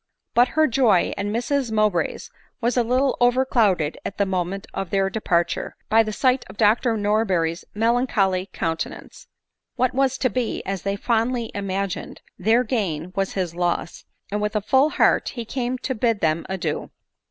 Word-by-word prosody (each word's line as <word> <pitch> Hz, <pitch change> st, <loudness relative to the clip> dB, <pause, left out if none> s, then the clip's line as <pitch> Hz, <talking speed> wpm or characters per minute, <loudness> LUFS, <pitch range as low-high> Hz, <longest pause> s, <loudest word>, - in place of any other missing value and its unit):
But 245 Hz, +1 st, +5 dB
her 315 Hz, -, +6 dB
joy, 230 Hz, -, +3 dB
and 200 Hz, +1 st, -3 dB
Mrs 245 Hz, +3 st, -1 dB
Mowbray's, 215 Hz, -4 st, 0 dB, 0.3 s
was 240 Hz, 0 st, 0 dB
a 245 Hz, -, +4 dB
little 255 Hz, +3 st, +1 dB
overcloud 245 Hz, -6 st, +3 dB
ed 150 Hz, +1 st, -3 dB
at 200 Hz, -, -6 dB
the 200 Hz, -, +2 dB
moment 190 Hz, +1 st, -2 dB
of 195 Hz, -, -4 dB
their 195 Hz, -1 st, +1 dB
departure, 170 Hz, -5 st, -1 dB
by 225 Hz, +1 st, +6 dB
the 215 Hz, -1 st, -2 dB
sight 255 Hz, +3 st, +2 dB
of 190 Hz, -, -12 dB
Dr 225 Hz, +2 st, +3 dB
Norberry's 195 Hz, -6 st, 0 dB
melancholy 210 Hz, -5 st, +1 dB
countenance. 165 Hz, 0 st, -4 dB, 0.5 s
What 255 Hz, 0 st, +1 dB
was 265 Hz, 0 st, +1 dB
to 255 Hz, -, +1 dB
be, 245 Hz, +1 st, -2 dB
as 195 Hz, -2 st, -3 dB
they 200 Hz, 0 st, -1 dB
fondly 230 Hz, +2 st, 0 dB
imagined, 195 Hz, -1 st, -3 dB, 0.2 s
their 225 Hz, +6 st, +3 dB
gain, 185 Hz, -, -2 dB
was 195 Hz, -1 st, -1 dB
his 180 Hz, -4 st, -2 dB
loss, 175 Hz, 0 st, -2 dB, 0.3 s
and 210 Hz, +1 st, -1 dB
with 210 Hz, +1 st, -2 dB
a 210 Hz, -, +1 dB
full 265 Hz, +7 st, +3 dB
heart -, -, +2 dB
he 235 Hz, -2 st, -4 dB
came 250 Hz, +1 st, -2 dB
to 260 Hz, -, -3 dB
bid 230 Hz, -2 st, +1 dB
them 160 Hz, -1 st, 0 dB
adieu. 175 Hz, -5 st, -3 dB
215 Hz, 170 wpm, -23 LUFS, 190-245 Hz, 0.5 s, her